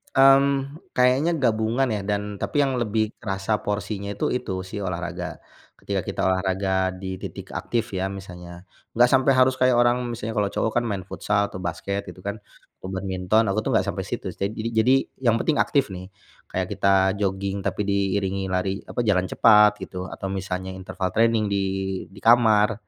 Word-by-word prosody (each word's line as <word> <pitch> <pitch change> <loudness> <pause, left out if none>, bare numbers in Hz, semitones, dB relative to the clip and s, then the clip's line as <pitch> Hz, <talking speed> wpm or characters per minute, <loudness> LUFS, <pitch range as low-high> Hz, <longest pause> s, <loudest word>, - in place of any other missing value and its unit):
Mmm, 135 +2 +4 0.2
kayaknya 130 +6 +3
gabungan 115 +2 +2
ya - - -2
dan 105 0 +1 0.2
tapi 145 - +1
yang 135 -1 0
lebih 110 0 0
kerasa 100 +1 -1
porsinya 100 0 -3
itu, - - -2
itu 120 - -7
si 95 - -9
olahraga. 90 -1 -4 0.5
Ketika - - -2
kita - - -3
olahraga 95 0 +1
di 95 - -5
titik - - -8
aktif 115 -1 -2
ya 95 +1 -1
misalnya. 90 -2 -9 0.3
Nggak 120 0 +6
sampai 130 +1 +4
harus 130 0 +5
kayak 130 -1 +4
orang, 120 +1 +3
misalnya 115 -1 -4
kalau 100 -1 +2
cowok 110 - -1
kan 120 - -4
main 100 -2 -3
futsal 105 +1 -1
atau 95 - -5
basket 90 +3 -3
gitu 90 - -11
kan, 100 +1 -2 0.4
atau 95 - -8
badminton 95 +3 +1
aku 110 - 0
tuh - - -3
nggak - - +3
sampai - - -2
situ - - -4
sih. 100 0 -2
Jadi 110 +1 -4
jadi 110 +4 +4 0.3
yang 115 -1 +5
penting 150 +5 0
aktif 140 -2 +2
nih. 95 +1 -8 0.4
Kayak - - -2
kita 100 - 0 0.3
jogging 95 0 -1
tapi 105 - -2
diiringi 100 -1 0
lari 95 +1 -1
apa - - -4
jalan 95 -3 +2
cepat 105 -2 +6
gitu, 90 - -8
atau 95 - -6
misalnya 95 -1 -4
interval 95 0 -4
training 115 -1 +3
di 100 - +1 0.5
di 95 - -14
kamar. 115 -2 +5
100 Hz, 180 wpm, -24 LUFS, 95-115 Hz, 0.5 s, Nggak